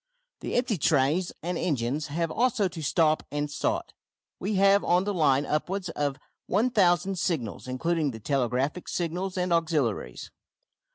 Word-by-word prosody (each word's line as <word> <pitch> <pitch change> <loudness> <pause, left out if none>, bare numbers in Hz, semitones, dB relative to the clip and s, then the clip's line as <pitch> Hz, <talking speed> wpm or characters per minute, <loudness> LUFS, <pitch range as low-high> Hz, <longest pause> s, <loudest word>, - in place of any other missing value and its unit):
The - - -4
empty 240 -6 +1
trains 155 +5 +2
and 175 0 -2
engines 145 -1 -1
have 165 +2 -2
also 230 -3 +2
to 170 -2 -7
stop 155 +1 +2
and 145 0 -2
start. 145 - -2 0.5
We 200 +3 -2
have 200 +1 +5
on 180 +1 +3
the 205 +1 -2
line 145 -5 +3
upwards 180 +6 -2
of 145 -3 -2 0.3
1000 195 -4 +2
signals, 130 - -2
including 155 +4 0
the 110 -4 -7
telegraphic 135 - -1
signals 180 +3 -3
and 180 -1 +1
auxiliaries. 150 - -1
165 Hz, 145 wpm, -27 LUFS, 145-185 Hz, 0.5 s, have